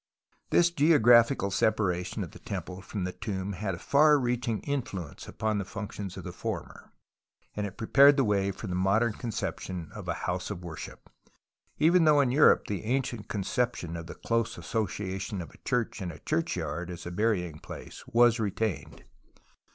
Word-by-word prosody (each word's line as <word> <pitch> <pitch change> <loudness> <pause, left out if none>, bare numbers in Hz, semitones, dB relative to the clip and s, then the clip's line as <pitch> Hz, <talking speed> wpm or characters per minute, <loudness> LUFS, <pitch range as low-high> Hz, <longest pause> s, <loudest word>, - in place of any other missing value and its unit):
This 175 0 +4
geographical 120 - +5
separation 90 -3 0
of - - -8
the - - -13
temple 90 +1 -6
from 95 0 -5
the 90 - -2
tomb 100 -1 -4
had 95 -1 -3
a 85 - -13
far 150 +1 +6
reaching 120 -4 -1
influence 105 - -4
upon 110 -1 -1
the - - -1
functions 100 -1 -6
of - - -7
the - - -6
former, - - -6 0.6
and 105 -2 -4
prepared 140 +5 +6
the 135 - +4
way 100 -3 +1
for 100 +2 -6
the 90 - -3
modern 100 +5 +2
concep 115 0 -4
tion 90 -4 -6
of - - -8
a - - -1
house - - -2
of 90 - -6
worship, 85 -2 -8 0.7
even 165 +2 +5
though 150 -1 +6
in 135 -3 +3
Europe 145 +4 +5
the 105 0 -4
ancient 120 -2 -1
conception 105 -4 -2
of 85 0 -6
the - - -8
close 115 0 -1
association 100 -3 -3
of 85 - -7
a - - -19
church 120 -4 -1
and 90 -2 -3
a - - -11
churchyard 90 - -2
(as 85 -1 -7
a 85 - -5
burying 90 -6 0
place) - - -10
was 120 0 +4
retained. 105 -2 -2
105 Hz, 175 wpm, -29 LUFS, 95-120 Hz, 0.7 s, far